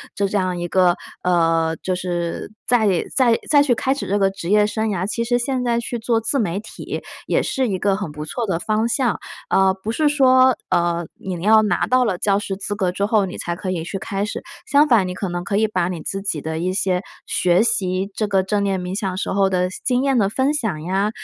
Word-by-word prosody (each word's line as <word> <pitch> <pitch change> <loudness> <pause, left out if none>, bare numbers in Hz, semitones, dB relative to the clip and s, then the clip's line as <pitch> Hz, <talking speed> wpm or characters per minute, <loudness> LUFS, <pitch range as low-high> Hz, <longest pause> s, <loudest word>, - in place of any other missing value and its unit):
就 200 0 +1
这 200 +1 -1
样 185 -1 0
一 175 - -3
个 180 -1 +3 0.3
呃， 165 -2 +2
就 185 - -1
是 175 0 -3 0.2
再 230 -4 +3 0.3
再 240 -4 +4
再 290 -1 +6
去 260 -4 +2
开 260 +3 0
始 280 - -5
这 205 +2 +1
个 195 -1 +3
职 190 -2 -7
业 210 0 +4
生 220 +1 -1
涯， 190 -2 -1
其 230 +2 -2
实 245 +1 +1
现 255 +1 -1
在 235 -1 +1
去 235 +1 -4
做 225 0 +1
自 250 +5 -1
媒 195 -3 -1
体 215 - -7 0.2
也 - - +1
是 265 -1 -1
一 190 -4 -2
个 195 0 +2
很 190 -7 -4
不 150 +1 -7
错 230 +9 -3
的 170 -3 0
方 220 +3 0
向。 240 -1 0 0.3
呃， 190 0 +4
不 195 +3 -5
是 300 +6 +1
说， 260 -3 +5
呃， 170 -1 +1
你 180 -3 -5
要 220 +1 +6
拿 210 - +1
到 255 0 +3
了 195 -6 0
教 200 -1 +2
师 200 -2 -4
资 205 +1 -4
格 190 -3 0
之 195 +2 -3
后， 210 -2 +3
你 185 - -7
才 170 - -3
可 185 +1 -4
以 165 -3 -2
去 195 - -4
开 195 0 -3
始， 210 - -5 0.2
相 295 -4 +4
反 225 -8 +4
你 180 - -4
可 195 0 -3
能 175 0 -3
可 200 +3 -1
以 220 +1 +3
把 180 -5 0
你 175 -3 -5
自 195 +5 -4
己 165 -7 -2
的 160 +1 -4
一 180 +2 -1
些 185 -2 0 0.2
学 180 +3 +2
习 190 -3 0
这 215 - -1
个 195 -2 +2
正 200 +1 0
念 195 -1 0
冥 180 +2 -4
想 190 -3 -2
时 - - -2
候 195 -1 +3
的 180 -1 +1 0.2
经 250 0 +1
验 275 -2 +2
的 195 -2 +2
分 265 +6 +1
享 210 - -2
呀， 195 +4 0
195 Hz, 265 characters per minute, -21 LUFS, 180-225 Hz, 0.3 s, 再